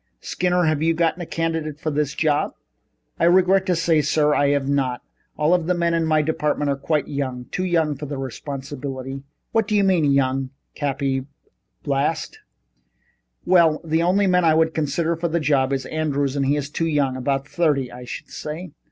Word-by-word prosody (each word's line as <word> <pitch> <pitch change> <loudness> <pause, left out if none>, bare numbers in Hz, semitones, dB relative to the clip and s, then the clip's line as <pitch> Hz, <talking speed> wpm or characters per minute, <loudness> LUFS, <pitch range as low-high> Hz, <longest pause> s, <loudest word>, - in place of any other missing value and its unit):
Skinner, 180 - 0
have 155 -2 +1
you 165 +1 +2
got 170 +2 0
a 170 - -6
candidate 160 -2 -2
for 155 - -2
this 145 -1 -1
job?" 150 -2 +1 0.6
"I - - +3
regret 185 +2 +4
to 180 - +2
say, 165 -2 +2
sir, 150 0 +2
I 145 - +3
have 140 -1 +1
not. 135 -3 0 0.3
All 150 +3 +3
of 175 -2 +1
the 180 - +2
men 170 -1 +1
in 165 -1 +1
my 155 -1 +3
department 150 -2 0
are - - 0
quite 150 +2 -1
young 130 -3 -4
too 185 - -2
young 165 -4 +1
for 145 +2 -7
the 140 0 -5
responsibility." 135 0 -6 0.3
"What 225 -2 +1
do 210 - 0
you 205 - +4
mean 185 -5 +3
young?" 135 -1 +1 0.2
Cappy 135 -2 -2 0.6
blazed. 145 +3 -1 1.1
"Well, 170 -4 +4
the 160 0 +1
only 185 +4 +3
man 180 -1 +3
I 160 -2 +4
would 160 0 +2
consider 160 +2 0
for 170 +1 -2
the 170 +1 0
job 140 -3 +2
is 135 -1 -1
Andrews 145 -3 -1
and 140 -1 0
he 145 - +3
is 145 -1 -3
too 165 +1 -1
young 145 -4 +1
about 135 +1 -1
thirty, 145 -4 0
I 125 0 -9
should 120 - -8
say." 155 +3 -6
150 Hz, 195 wpm, -22 LUFS, 140-165 Hz, 1.1 s, regret